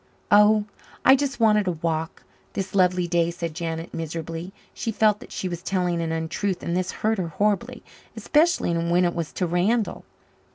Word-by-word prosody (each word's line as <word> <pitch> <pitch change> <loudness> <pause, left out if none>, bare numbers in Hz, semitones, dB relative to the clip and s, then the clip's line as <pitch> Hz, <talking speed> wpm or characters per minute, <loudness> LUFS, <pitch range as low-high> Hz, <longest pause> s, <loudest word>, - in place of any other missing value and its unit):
"Oh 210 0 +6 0.4
I 265 - +8
just 275 -1 -2
wanted 210 -3 +4
a 180 - +1
walk 160 +1 -3 0.3
this 195 -1 -4
lovely 180 -2 +3
day," 170 -1 +2
said 170 -1 -5
Janet 165 0 -5
miserably. 165 +2 -5 0.2
She 225 - -3
felt 210 -1 +3
that - - -13
she 185 - -3
was 175 -1 -5
telling 180 -3 -1
an 165 -1 -2
untruth 165 +4 -2
and 170 - -2
this 185 0 -1
hurt 220 -1 +2
her 180 - -1
horribly 210 +8 -1 0.3
especially 300 - +2
when 170 +2 +2
it 175 - 0
was 170 -3 -4
to 185 - -1
Randall. 195 +6 0
180 Hz, 175 wpm, -24 LUFS, 170-210 Hz, 0.4 s, I